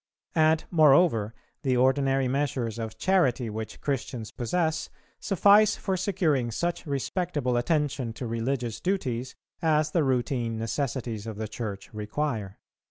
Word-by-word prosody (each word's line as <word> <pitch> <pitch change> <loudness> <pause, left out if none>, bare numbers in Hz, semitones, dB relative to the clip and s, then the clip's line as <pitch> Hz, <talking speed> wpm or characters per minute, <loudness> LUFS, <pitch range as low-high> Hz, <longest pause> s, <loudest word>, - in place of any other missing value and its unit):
And, 160 0 +3
moreover, 140 - +4 0.3
the 130 -3 +1
ordinary 135 +1 +3
measures 125 -4 -1
of 110 -1 -5
charity 130 - +2
which 110 0 -6
Christians 125 -5 -3
possess, 160 +6 -1 0.3
suffice 205 +2 +5
for 190 - -2
securing 170 - +1
such 170 +8 -2
respectable 145 -2 -1
attention 135 -1 0
to 125 - -6
religious 115 0 -2
duties 130 -10 -2 0.3
as 155 -2 +2
the 165 -2 +2
routine 120 -3 0
necessities 115 -2 -3
of 110 -2 -6
the 110 0 -3
Church 105 -1 -6
require. 105 -1 -3
130 Hz, 125 wpm, -27 LUFS, 115-155 Hz, 0.3 s, suffice